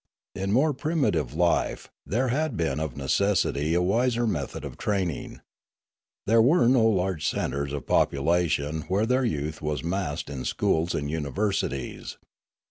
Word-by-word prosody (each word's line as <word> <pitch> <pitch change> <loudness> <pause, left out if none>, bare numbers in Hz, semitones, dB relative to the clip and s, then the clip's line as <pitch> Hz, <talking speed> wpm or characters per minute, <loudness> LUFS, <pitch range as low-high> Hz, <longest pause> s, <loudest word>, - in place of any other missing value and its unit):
In 95 0 -3
more 140 +7 +3
primitive 130 - 0
life, - - +1 0.2
there 125 +6 0
had 145 -1 -1
been 80 -4 0
of 80 -5 -4
necessity 80 0 +1
a 90 - +2
wiser 120 +5 +1
method 80 - -3
of - - -7
training. 95 -7 -2 0.8
There 115 +2 +5
were 125 +1 +4
no 120 -3 +5
large 95 -6 0
centres 70 0 -2
of 70 -1 -5
population 80 0 +1
where 100 +4 +1
their 125 +3 +2
youth 75 -4 -3
was 75 -3 -2
massed 85 -3 -2
in 70 -3 -5
schools 80 +6 0
and 70 - -2
universities. 80 -3 -2
90 Hz, 140 wpm, -26 LUFS, 75-115 Hz, 0.8 s, There